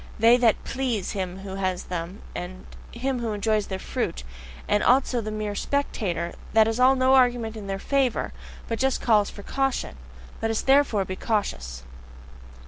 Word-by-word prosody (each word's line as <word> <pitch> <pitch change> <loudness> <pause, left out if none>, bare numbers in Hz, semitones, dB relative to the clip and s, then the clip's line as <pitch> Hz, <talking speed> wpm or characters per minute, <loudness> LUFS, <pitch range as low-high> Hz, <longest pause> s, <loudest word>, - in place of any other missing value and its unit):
That 235 +3 +5
they 230 -3 +6
PLEASE 255 -7 -2
him 185 -2 -4
who 195 -1 -6
has 185 -2 -1
them, 180 +3 -5
and 185 +1 -7 0.3
him 255 +2 -2
who 230 -2 -2
enjoys 210 0 0
their 190 - -3
fruit, 65 - -3 0.4
and 210 - +2
also 250 -1 +3
the 215 - -4
mere 215 -1 -3
spectator 205 -9 -2 0.2
that 220 0 +6
is 225 0 -1
still 255 +2 +5
no 260 0 +3
argument 245 -4 +3
in 210 -2 -7
their 195 0 -2
FAVOUR, 265 +3 0 0.3
but 230 -1 -3
just 265 0 +1
calls 210 -3 +3
for 200 - -10
caution. 270 - -1 0.4
Let 225 - 0
us 225 - 0
therefore 270 -8 +4
be 185 - -4
cautious! 65 - -2
220 Hz, 170 wpm, -25 LUFS, 195-250 Hz, 0.4 s, they